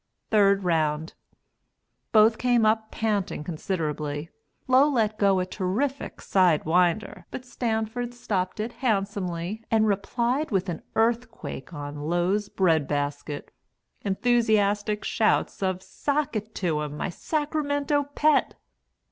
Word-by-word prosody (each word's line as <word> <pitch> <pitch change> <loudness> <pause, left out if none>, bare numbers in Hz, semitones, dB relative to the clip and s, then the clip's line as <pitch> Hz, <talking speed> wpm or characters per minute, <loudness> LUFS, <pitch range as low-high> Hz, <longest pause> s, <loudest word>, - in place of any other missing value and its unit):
Third 200 -2 +4
Round. 160 -2 0 1.0
Both 220 0 +5
came 245 -3 +3
up 220 0 +2
panting 205 -7 -1
considerably. 155 -3 -3 0.4
Low 260 +3 +5
let 215 -6 0
go 195 -2 +4
a 180 - 0
terrific 215 +10 -2
side 180 -5 +3
winder, 175 +5 +1
but 255 - -7
Stanford 240 0 -2
stopped 190 -5 -2
it 225 +3 -3
handsomely 200 -4 -2
and 220 -1 +3
replied 235 +8 0
with 195 -3 0
an 165 - -4
earthquake 225 - -1
on 145 -2 -6
Low's 185 +4 +1
bread 160 -7 +2
basket. 145 0 -3 0.5
(Enthusiastic 210 -1 +1
shouts 215 - +1
of 185 -1 -1
"Sock 285 +2 -2
it 215 +1 -4
to 160 -5 0
him, 150 0 -5
my - - -2
Sacramento 290 - -1
Pet!") 305 0 +3
205 Hz, 120 wpm, -26 LUFS, 175-235 Hz, 1.0 s, Both